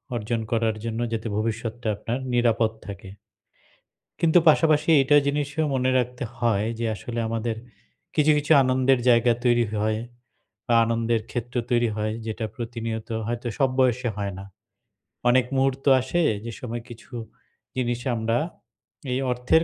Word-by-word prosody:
অর্জন 115 +1 -2
করার 115 -1 +1
জন্যে 115 +1 -2
যাতে 115 0 -2
ভবিষ্যৎটা 115 +1 -3
আপনার 115 +5 -3
নিরাপদ 115 -2 +2
থাকে। 100 -2 -8 1.1
কিন্তু 165 +1 +4
পাশাপাশি 155 0 +3
এইটা 145 +2 +4
জিনিস 145 0 0 0.3
মনে 130 0 +1
রাখতে 125 0 -2
হয় 110 -4 +1
যে 115 - -1
আসলে 115 +4 -5
আমাদের 115 0 -2 0.6
কিছু, 155 0 +4
কিছু 150 +2 -1
আনন্দের 130 0 +3
জায়গা 120 0 +5
তৈরি 120 -1 +4 0.2
হয় 110 0 0 0.7
বা 120 - +2
আনন্দের 115 0 0
ক্ষেত্র 120 0 -5 0.2
তৈরি 120 -1 +3
হয় 110 0 -1
যেটা 110 0 -3
প্রতিনিয়ত 115 -2 -5 0.2
হয়তো 120 +1 -3
সব 135 -1 +4
বয়সে 125 -1 +2
হয় 100 -1 -3
না। - - -7 0.9
অনেক 125 0 +4
মুহূর্ত 135 +1 0 0.2
আসে 170 +7 0 0.2
যে 115 - -4
সময় 120 -1 -5
কিছু 120 +2 -13 0.6
জিনিস 120 -1 -1 0.2
আমরা 115 +1 0 0.8
এই 130 - 0
অর্থের, 125 +7 +3
120 Hz, 140 wpm, -25 LUFS, 115-130 Hz, 1.1 s, জায়গা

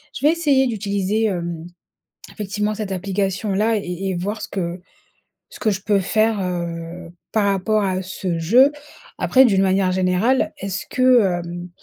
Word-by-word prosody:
je 275 - -3
vais 300 - +6
essayer 285 -6 +2
d'utiliser, 205 -1 -1
hem, 170 -5 -3 0.7
effectivement 210 0 -2
cette 210 -2 -4
application-là 195 +3 0
et - - -5 0.3
et - - -2
voir 205 +5 -3
ce - - -5
que 175 -2 -4 0.7
ce - - -13
que 215 - +1
je 195 -1 -3
peux 205 0 +2
faire, 215 +3 +1
heu, 170 -1 -5 0.2
par 215 -2 +2
rapport 200 +2 +1
à 185 -1 -1
ce 185 -1 -3
jeu. 245 - +5 0.5
Après 265 0 +5
d'une 195 -5 +3
manière 190 -1 +2
générale, 185 +8 +1
est-ce 195 0 -4
que, 255 -2 +5 0.2
hem 175 +1 -7
195 Hz, 155 wpm, -21 LUFS, 180-220 Hz, 0.7 s, vais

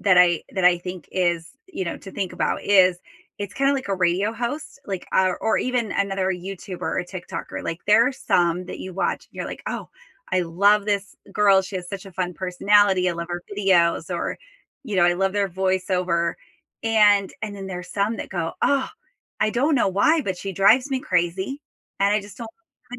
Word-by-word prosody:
that 185 -3 +5
I 175 -2 +5
that 190 -2 -1
I 180 -1 +6
think 180 -1 -8
is 175 -2 0 0.2
you 190 - -4
know, 170 - -4
to 195 - -11
think 190 -3 -3
about - - -1
is 185 -3 +5 0.4
it's 205 -2 -5
kinda 275 +1 +2
like 265 -5 -3
a 195 - +1
radio 185 +4 +1
host, 245 +5 -5
like, 190 -3 -4
our 185 -1 +3
or 220 - +1
even 245 -4 -1
another 195 -1 0
YouTuber 185 0 -6
or 180 - -1
TikToker, 180 0 -7
like 165 +1 -4
there 220 +3 +6
are - - -4
some 175 -6 +1
that - - -7
you 185 - -7
watch, 195 - -1
and - - -22
you're - - -4
like, - - -7
"Oh, - - -4 0.4
I 185 - +3
love 200 +5 +3
this 205 -1 -2 0.2
girl, 200 -2 +5
she 190 +1 -6
has 180 -1 -6
such 195 0 -7
a 190 - -11
fun 180 -1 -3
personality, 190 0 +3
I - - -2
love 170 0 -5
her 175 0 -4
videos," 190 -4 +2
or, - - -3 0.5
you 210 -6 -3
know, 175 - +5
"I 175 0 +4
love 195 +1 0
their 200 -1 +1
voiceover," 185 -2 0 0.5
and 210 -3 +4
and 205 -2 -4
then 195 - -7
there's 180 -1 -7
some 205 +3 0
that - - -5
go, 170 -3 -2
"Oh, 275 -2 +2 0.5
I 215 - +3
don't 280 +7 +2
know 235 - +3
why, 285 - +3
but 190 -5 -3
she 195 +1 -5
drives 220 +9 +4
me 265 -1 0
crazy, 185 - -1 0.4
and 200 +1 +4
I 210 - +2
just 205 +4 -13
don't 230 -2 -6 0.4
like 245 - -7
195 Hz, 210 wpm, -23 LUFS, 180-210 Hz, 0.5 s, I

